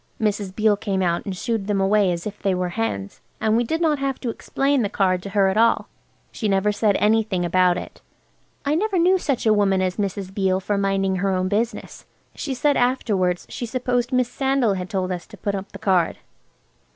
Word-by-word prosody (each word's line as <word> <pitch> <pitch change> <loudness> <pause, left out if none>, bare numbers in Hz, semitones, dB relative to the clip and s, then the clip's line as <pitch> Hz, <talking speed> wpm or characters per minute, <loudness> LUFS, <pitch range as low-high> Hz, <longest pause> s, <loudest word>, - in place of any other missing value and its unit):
Mrs. 205 -3 -1
Beale 215 -1 +3
came 195 -3 -1
out 170 -1 0
and 190 -2 -4
shoo 235 - -2
ed 210 -3 -2
them 205 -2 +1
away 195 0 +3
as 170 -1 -4
if 210 -1 -6
they 195 -2 +1
were 180 0 -1
hens. 135 - -3 0.2
And 220 0 +2
we 235 - +3
did 320 +8 -2
not 310 -4 +2
have 275 -1 -2
to 240 - -2
explain 275 +4 0
the 205 - 0
card 185 -3 +1
to 200 - -7
her 195 -1 +3
at 190 +2 0
all. 230 +1 +3 0.4
She 220 - -3
never 195 +1 +2
said 205 -1 +1
anything 210 -4 +2
about 180 0 +3
it. - - -8 0.6
I 285 - +1
never 390 +4 0
knew 365 +2 +4
such 275 -9 -1
a 220 - +5
woman 200 -2 +2
as 185 -1 -1
Mrs. 195 -2 -3
Beale 190 -2 +1
for 205 +2 -2
minding 195 -1 0
her 195 +2 0
own 185 -1 0
business. 220 +3 -3 0.3
She 270 - -4
said 285 +3 +2
afterwards 205 -8 +1
she 240 - -5
supposed 245 0 -1
Miss 255 -1 +2
Sandal 265 -4 +1
had 185 -1 -4
told 185 -1 -2
us 175 -1 -5
to - - -13
put 200 - -2
up 195 0 -5
the - - -8
card. 180 -4 +1
205 Hz, 220 wpm, -22 LUFS, 190-235 Hz, 0.6 s, a